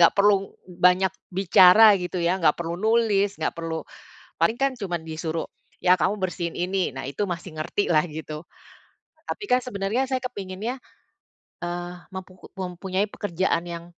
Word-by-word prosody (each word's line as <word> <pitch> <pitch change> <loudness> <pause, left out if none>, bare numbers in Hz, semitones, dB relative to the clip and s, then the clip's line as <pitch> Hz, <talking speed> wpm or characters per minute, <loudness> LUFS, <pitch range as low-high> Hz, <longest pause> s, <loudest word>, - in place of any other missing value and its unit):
nggak 170 - +7
perlu 200 -1 +3
banyak 180 +1 +3 0.2
bicara 195 +3 +7
gitu 180 +1 -4
ya, 180 +3 +1
nggak 165 - +4
perlu 170 0 -3
nulis, 215 -3 +2
nggak - - 0
perlu 165 -1 -4 0.6
paling 225 - +4
kan 275 -1 +2
cuma 180 -4 -2
disuruh 160 0 -4 0.3
ya 180 0 +5
kamu 205 +3 +1
bersihin 175 -2 -2
ini, 185 -1 0
nah 130 - -5
itu 205 +9 -2
masih 170 -2 -6
ngerti 175 +5 -1
lah 155 -1 +4
gitu. 155 +1 -7 0.8
Tapi 420 - -5
kan 250 - +5
sebenarnya 220 +2 -1
saya 260 -1 0
kepinginnya, 210 0 -4 0.9
eee, 175 0 -4 0.2
mempuku 185 -1 -10
mempunyai 185 +2 -2
pekerjaan 180 -4 -1
yang, 170 0 -6
185 Hz, 150 wpm, -25 LUFS, 170-205 Hz, 0.9 s, nggak